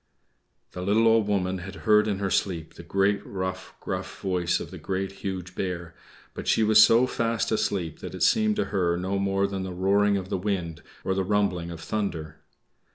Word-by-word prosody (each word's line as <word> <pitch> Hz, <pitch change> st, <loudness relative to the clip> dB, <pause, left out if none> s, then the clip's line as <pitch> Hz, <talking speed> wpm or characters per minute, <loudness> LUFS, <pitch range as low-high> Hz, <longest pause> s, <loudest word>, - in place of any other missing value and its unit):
The 90 Hz, -, -6 dB
little 105 Hz, +5 st, +3 dB
Old 110 Hz, -2 st, +4 dB
Woman 95 Hz, -2 st, 0 dB
had 95 Hz, +2 st, -8 dB
heard 105 Hz, -1 st, +5 dB
in 100 Hz, -2 st, 0 dB
her 100 Hz, -1 st, -2 dB
sleep 85 Hz, -5 st, -1 dB
the -, -, -11 dB
great, 95 Hz, +4 st, +1 dB
rough, 95 Hz, -1 st, -5 dB
gruff -, -, -5 dB
voice 90 Hz, -2 st, 0 dB
of -, -, -7 dB
the 90 Hz, -, -8 dB
Great, 95 Hz, +3 st, -2 dB
Huge 95 Hz, -2 st, -4 dB
Bear, 85 Hz, -3 st, -4 dB, 0.4 s
but -, -, -7 dB
she 110 Hz, -, +3 dB
was 110 Hz, 0 st, +7 dB
so 115 Hz, +3 st, +5 dB
fast 115 Hz, -3 st, -1 dB
asleep 95 Hz, -7 st, -1 dB
that -, -, -7 dB
it -, -, -1 dB
seemed 215 Hz, -1 st, +3 dB
to 210 Hz, -, 0 dB
her 85 Hz, -3 st, +1 dB
no 95 Hz, +2 st, -1 dB
more 100 Hz, 0 st, +1 dB
than 100 Hz, -1 st, -3 dB
the 95 Hz, -1 st, -5 dB
roaring 100 Hz, +2 st, +2 dB
of 95 Hz, -1 st, -5 dB
the -, -, -1 dB
wind, 90 Hz, -5 st, -2 dB, 0.2 s
or 95 Hz, -, 0 dB
the 95 Hz, 0 st, 0 dB
rumbling 95 Hz, -4 st, 0 dB
of 85 Hz, -1 st, -8 dB
thunder. 80 Hz, -8 st, -3 dB
95 Hz, 200 wpm, -26 LUFS, 90-105 Hz, 0.4 s, was